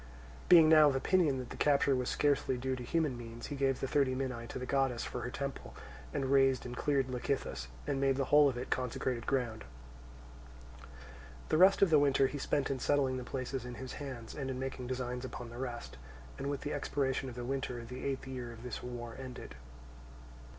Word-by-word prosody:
Being 165 Hz, -3 st, +9 dB
now 155 Hz, -1 st, +8 dB
of 135 Hz, -, -1 dB
opinion 150 Hz, 0 st, +2 dB
that 125 Hz, -2 st, -6 dB
the -, -, -6 dB
capture 140 Hz, -1 st, +3 dB
was 125 Hz, -1 st, -1 dB
scarcely 140 Hz, -3 st, +1 dB
due 130 Hz, +1 st, -2 dB
to 125 Hz, -, -7 dB
human 150 Hz, +1 st, 0 dB
means, 115 Hz, -1 st, -8 dB
he -, -, -3 dB
gave 135 Hz, -1 st, +1 dB
the 135 Hz, -, -2 dB
thirty 135 Hz, -2 st, +2 dB
minae 130 Hz, -3 st, -3 dB
to -, -, -6 dB
the 125 Hz, -, -4 dB
goddess 135 Hz, -3 st, +1 dB
for 125 Hz, -, -4 dB
her 125 Hz, -, -3 dB
temple, 140 Hz, +1 st, -5 dB, 0.4 s
and 135 Hz, -, -1 dB
razed 135 Hz, -2 st, +4 dB
and 125 Hz, 0 st, -5 dB
cleared 140 Hz, 0 st, +1 dB
Lecythus, 125 Hz, -, -2 dB, 0.2 s
and 135 Hz, -, -1 dB
made 135 Hz, -1 st, +3 dB
the 135 Hz, 0 st, 0 dB
whole 145 Hz, -1 st, +8 dB
of 125 Hz, -, -4 dB
it 125 Hz, -, -6 dB
consecrated 125 Hz, -1 st, -2 dB
ground. 120 Hz, -5 st, -1 dB, 1.9 s
The 155 Hz, -, +3 dB
rest 195 Hz, +2 st, +7 dB
of 185 Hz, -, +4 dB
the 155 Hz, -, +7 dB
winter 140 Hz, -1 st, +4 dB
he 145 Hz, +2 st, -2 dB
spent 140 Hz, 0 st, 0 dB
in 135 Hz, -, -2 dB
settling 135 Hz, -1 st, +1 dB
the 125 Hz, -, -4 dB
places 130 Hz, 0 st, -4 dB
in 125 Hz, 0 st, -7 dB
his 130 Hz, 0 st, -7 dB
hands, 125 Hz, -5 st, -6 dB
and 135 Hz, -3 st, -4 dB
in 130 Hz, -, -3 dB
making 130 Hz, -1 st, -4 dB
designs 125 Hz, -1 st, -3 dB
upon 125 Hz, -2 st, -7 dB
the 120 Hz, -, -8 dB
rest; 120 Hz, -2 st, -5 dB, 0.4 s
and 140 Hz, -, -4 dB
with 140 Hz, -1 st, -3 dB
the 145 Hz, -, -3 dB
expiration 135 Hz, -2 st, -1 dB
of 120 Hz, -, -9 dB
the 120 Hz, -1 st, -5 dB
winter 125 Hz, -2 st, -3 dB
the 125 Hz, +2 st, -7 dB
eighth 135 Hz, -1 st, -2 dB
year 125 Hz, -2 st, -6 dB
of 115 Hz, 0 st, -11 dB
this 125 Hz, -2 st, -5 dB
war 120 Hz, -2 st, -6 dB
ended. 125 Hz, -, -8 dB
130 Hz, 210 wpm, -33 LUFS, 125-140 Hz, 1.9 s, Being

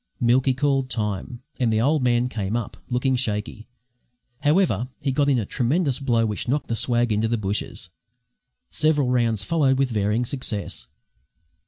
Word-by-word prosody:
Milky 130 Hz, +2 st, +3 dB
called 135 Hz, -1 st, +1 dB
time, 110 Hz, +2 st, -3 dB, 0.2 s
and 120 Hz, -3 st, +2 dB
the 110 Hz, -, +2 dB
old 145 Hz, +5 st, +2 dB
man 120 Hz, 0 st, +2 dB
came 110 Hz, -2 st, -2 dB
up, 115 Hz, -4 st, -5 dB
looking 130 Hz, +1 st, +1 dB
shaky. 110 Hz, -2 st, -3 dB, 0.7 s
However, 145 Hz, -, +2 dB
he 140 Hz, -, -1 dB
got 145 Hz, +2 st, +2 dB
in 135 Hz, -, +3 dB
a 110 Hz, -, -1 dB
tremendous 135 Hz, -, 0 dB
blow 120 Hz, -5 st, +1 dB
which 105 Hz, +1 st, -3 dB
knocked 140 Hz, +3 st, -1 dB
the 115 Hz, -, 0 dB
swag 120 Hz, 0 st, +1 dB
into 105 Hz, +1 st, +1 dB
the 115 Hz, +1 st, 0 dB
bushes. 100 Hz, -3 st, -4 dB, 0.8 s
Several 150 Hz, -4 st, +2 dB
rounds 115 Hz, -4 st, +1 dB
followed 140 Hz, -2 st, +2 dB
with 135 Hz, -2 st, +1 dB
varying 105 Hz, +2 st, 0 dB
success. 115 Hz, -, -5 dB
120 Hz, 160 wpm, -23 LUFS, 110-135 Hz, 0.8 s, Milky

